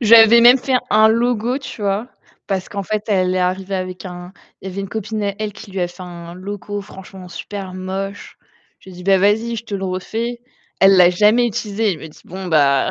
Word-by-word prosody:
J'avais 230 0 +8
même 245 +2 +8
fait 260 +1 -1 0.2
un 215 +1 +6
logo, 240 +2 +1
tu 260 -5 -9
vois? 200 +4 -1 0.4
Parce 190 -2 -2
qu'en 200 -1 -4
fait, 215 +2 -3
elle 185 -3 +2
est - - +1
arrivée 185 +2 -1
avec 185 0 -5
un 180 0 -8 0.3
il 190 - -7
y - - -7
avait 195 - -4
une 195 - -5
copine 215 0 -4
à 200 -1 -1
elle 215 -1 -3
qui 215 0 -12
lui 190 - -4
a 175 - 0
fait 175 +1 -12
un 170 -1 -9
logo 205 +2 -6
franchement 190 -2 -11
super 190 +2 -7
moche. 190 +2 -6 0.4
J'ai 190 - -14
dit: 180 0 -11
«Bah 195 -1 +4
vas-y, 220 +4 +2
je 230 - -6
te 210 -3 -6
le 195 0 -3
refais». 225 +6 -3 0.4
Elle 195 0 +7
l'a 180 -1 +7
jamais 215 +6 +4
utilisé, 210 -1 -1
elle 160 - -7
me 160 - -9
dit: 155 - -17
«Bon, 190 +1 -7
bah 140 -5 +3
195 Hz, 225 wpm, -19 LUFS, 185-220 Hz, 0.4 s, J'avais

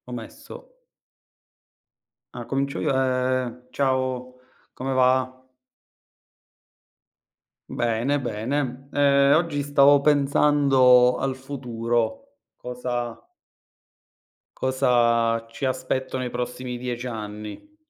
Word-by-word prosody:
Ho - - -8
messo. - - -11 1.5
Ah, - - -7
comincio 140 +2 -2
io. 145 - 0
Ehm, 130 -1 -1
ciao, 130 -1 -1 0.3
come 135 +1 -3
va? 130 0 +2 2.3
Bene, 120 +5 0
bene. 130 +3 -3
Ehm, 140 -1 +4
oggi 160 -3 0
stavo 145 0 +5
pensando 140 -3 +4
al 135 -1 -2
futuro, 120 - -3 0.2
cosa 125 -1 -5 1.3
cosa 120 -3 +2
ci 115 +4 -5
aspetto 130 0 -2
nei 130 -1 -3
prossimi 125 +1 -5
10 125 0 -4
anni. 105 - -8
130 Hz, 85 wpm, -24 LUFS, 120-140 Hz, 2.3 s, stavo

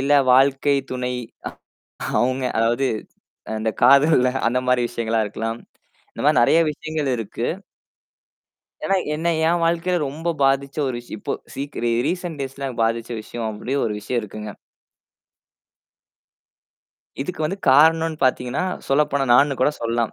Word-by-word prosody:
இல்ல 140 +2 +1 0.2
வாழ்க்கை 135 +2 +4
துணை 125 0 -2 1.1
அவுங்க 130 +2 0
அதாவது, 120 +4 +2 0.6
அ - - -4
அந்தக் 110 0 -3
காதல்ல 140 0 +6 0.2
அந்தமாரி 125 +1 +1
விஷயங்களா 115 -1 -1
இருக்கலாம். 115 +2 -4 0.5
இந்தமாரி - - +2
நெறையா 160 +7 +5
விஷயங்கள் 155 -2 -3
இருக்கு. 115 +2 -4 1.4
ஏன்னா, 195 - +2 0.2
என்ன 165 +3 -1 0.2
என் 170 +1 +2
வாழ்க்கையில 170 +2 +1
ரொம்ப 160 +5 -5
பாதிச்ச 135 0 +1
ஒரு 130 - -2
விஷய 120 -2 -9
இப்போ - - -4 0.2
சீக்கிர 140 -3 -5
ஏ 115 - 0
ரீசன்ட் 175 -3 -3
டேய்ஸ்ல 135 0 -4
பாதிச்ச 115 +1 -1
விஷயம் 115 +1 -5
அப்பிடி 110 +4 -6
ஒரு 110 - -1
விஷயம் 120 +3 -2
இருக்குங்க. 105 0 -7 2.7
இதுக்கு 175 +4 -6
வந்து 185 +6 -2
காரணன்னு 160 +3 +5
பாத்தீங்கன்னா, 125 +5 0 0.2
சொல்லப்போனா, 140 0 +2
நானு 140 +1 +4
கூடச் 145 +3 +1
சொல்லலாம். 115 0 -1
135 Hz, 125 wpm, -22 LUFS, 120-150 Hz, 2.7 s, காதல்ல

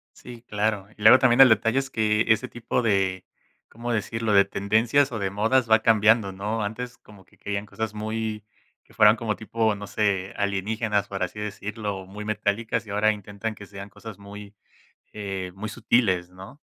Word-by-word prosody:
Sí, 120 -2 -12
claro. 105 -2 -1
Y 105 - -15
luego 110 +5 +8
también 125 0 +3
el 130 - +9
detalle 115 +4 +3
es 135 0 -4
que 110 -2 +1
ese 110 +3 +2
tipo 120 +1 -2
de, 95 -4 0 0.4
¿cómo 120 +2 -5
decirlo?, 115 +1 -1
de 100 0 +7
tendencias 115 +8 +1
o 115 - -4
de 95 -1 -1
modas 110 +4 +1
va 110 0 +6
cambiando, 110 -2 +4
¿no? 105 +4 -3
Antes 120 +4 -5
como 100 -3 -17
que - - -27
querían 100 0 -4
cosas 110 0 -5
muy 110 0 -4 0.4
que - - -23
fueran 105 +2 +6
como 110 -2 -2
tipo, 110 0 -1
no 100 0 -8
sé, 100 -3 -1
alienígenas, 100 +1 -1
por 95 -1 -6
así 100 +4 -5
decirlo, 105 -1 -5
muy 105 +2 -8
metálicas, 110 +2 -1
y - - -11
ahora 105 +2 +2
intentan 105 +1 -6
que 100 -1 -12
sean 100 0 -9
cosas 105 0 -11
muy 100 0 -11 0.6
eh, 95 -3 -5
muy 105 +2 -5
sutiles, 105 -6 +1
¿no? 95 +10 -13
105 Hz, 185 wpm, -25 LUFS, 100-115 Hz, 0.6 s, el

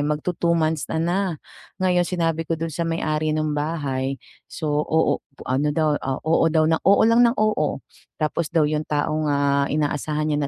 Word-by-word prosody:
magtu-two 170 +3 -1
months 160 -2 0
na 160 - 0
na. 175 +3 0 0.6
Ngayon, 180 -1 +2
sinabi 165 -2 -1
ko 165 - -3
dun 165 +1 -3
sa 170 +3 -2
may-ari 155 -2 -1
nung 155 -1 -1
bahay. 140 -3 -2 0.3
So, 150 -1 -1
oo, 160 0 +1 0.3
ano 135 +4 +1
daw, 155 -1 +1
ah, 135 0 -3
oo 165 +1 +2
daw, 160 -1 +3
oo 190 +5 +4
lang 230 +1 +4
ng 235 +2 +2
oo. 210 -10 0 0.4
Tapos 155 +1 -1
daw 160 -3 +3
yung 155 0 -1
taong, 150 +1 -1
ah, 140 -1 +2
inaasahan 150 +1 -1
niya 150 - 0
155 Hz, 170 wpm, -23 LUFS, 150-165 Hz, 0.6 s, oo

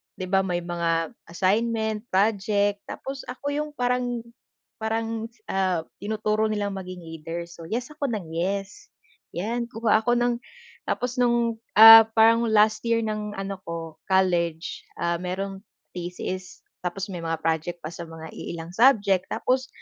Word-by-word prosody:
'di - - -6
ba, 195 - +5
may 180 -2 -1
mga 170 -1 -1 0.2
assignment, 220 +4 0
project. 205 0 +2
Tapos 270 0 -6
ako 270 +3 -4
'yong 300 +1 -2
parang 245 -2 0 0.6
parang, 225 0 -2 0.2
ah, 185 -4 +1 0.2
tinuturo 215 +1 0
nilang 205 -1 -1
maging 185 -2 -7
leader. 165 +1 -6
So, 170 -1 -11
yes 245 - -3
ako 295 -2 -2
nang 190 -8 -4
yes, 195 +4 -3 0.5
'yan. 235 +6 -2
Kuha 225 -2 +2
ako 240 +2 +3
ng 240 0 +2 0.5
tapos 250 +1 -2
no'ng, 235 -2 +2 0.2
ah, 225 0 +12
parang 230 +1 +5
last 215 0 +4
year 230 0 +2
ng 215 -1 -3
ano 195 0 -5
ko, 165 -1 -6
college, 175 -3 0
ah, 170 0 0
mayroong 190 +2 -4 0.4
thesis. 180 +1 -6 0.2
Tapos 185 +2 -3
may 180 - -5
mga 165 -1 -2
project 165 +2 -1
pa 155 - -5
sa 170 0 -7
mga 160 -1 -9
iilang 165 0 -6
subject. 205 -6 +4
Tapos 260 +1 0
200 Hz, 145 wpm, -25 LUFS, 175-225 Hz, 0.6 s, ah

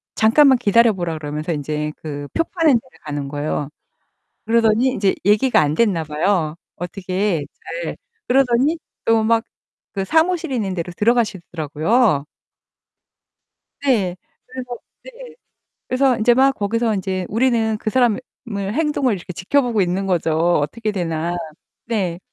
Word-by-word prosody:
잠깐만 260 +4 +5
기다려 230 0 +4
보라 175 -4 -3
그러면서 150 +2 -3
이제 150 +1 -3
그 145 -2 -5
표 330 - +2
파는 330 -3 +2
데를 250 +2 -2
가는 145 -2 -4
거예요. 145 0 -3 0.8
그러더니 225 +1 +3
인제 200 -6 +1
얘기가 215 +3 +4
안 150 -1 +1
됐나 185 -6 +1
봐요 155 +1 0 0.2
어떻게 185 -1 -2 0.4
잘. - - -4 0.3
그러더니 270 +4 +3 0.3
또 225 -1 +3
막 225 0 +3 0.5
그 195 -2 -1
사무실 325 - +1
있는 205 -7 -1
데로 175 0 -4
들어가시더라고요. 190 - +1 1.6
네. 205 -10 +1 0.4
그래서 250 -1 -6 0.3
네. - - -11 0.5
그래서 255 -1 +2
인제 235 +2 +4
막 270 +2 +4
거기서 225 +2 0
인제 185 -1 -2
우리는 225 -1 +1
그 215 - -3
사람의 245 0 +2 0.3
행동을 250 +6 0
이렇게 180 0 -8
지켜보고 230 +4 +1
있는 185 +2 0
거죠 165 -4 0 0.2
어떻게 215 +9 -2
되나. 170 -3 -2 0.5
네. 190 -7 -2
210 Hz, 290 characters per minute, -20 LUFS, 170-245 Hz, 1.6 s, 잠깐만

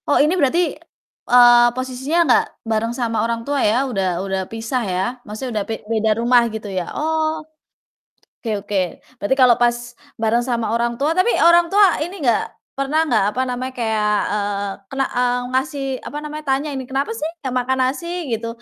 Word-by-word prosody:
Oh 290 - +4
ini 305 +4 +2
berarti, 340 -1 +2 0.7
eee, 240 -1 +7
posisinya 260 +5 -2
nggak 250 - +4 0.2
bareng 225 +1 -1
sama 230 -2 0
orang 230 0 -2
tua 285 -1 0
ya? 245 +6 +1
Udah 195 -4 -1 0.2
udah 190 -1 -2
pisah 225 +3 -3
ya? 180 - 0 0.2
Maksudnya 220 +4 -6
udah - - -4
pe - - -1 0.2
beda 220 0 +2
rumah 240 +1 +4
gitu 220 -1 -6
ya? - - -2
Oh. 315 0 0 1.1
Oke 220 -3 -2
oke, 200 0 -3 0.4
berarti 205 +6 +1
kalau 255 -2 +6
pas 240 0 +3 0.4
bareng 225 +2 +2
sama 240 -2 -1
orang 235 0 0
tua 295 +5 +1
tapi 370 +6 +3 0.2
orang 340 0 +6
tua 405 +2 +6 0.2
ini 345 -1 -4
enggak, 235 -3 +3 0.3
pernah 290 +4 0
enggak, 230 -9 +2
apa 250 +5 -2
namanya, 255 +1 -4
kayak, 220 -3 0 0.2
eee, 205 -1 -1 0.2
kena 270 0 -1
eee, 245 0 +2 0.2
ngasih, 275 +2 -1 0.2
apa 295 - -6
namanya, 305 +1 -6
tanya 270 +3 +1
ini, 265 -1 -4
kenapa 270 +8 -1
sih 320 -8 -3 0.2
nggak 260 - -2
makan 260 +1 -1
nasi, 280 +6 -3 0.3
gitu. 225 +1 -3
250 Hz, 180 wpm, -20 LUFS, 225-285 Hz, 1.1 s, eee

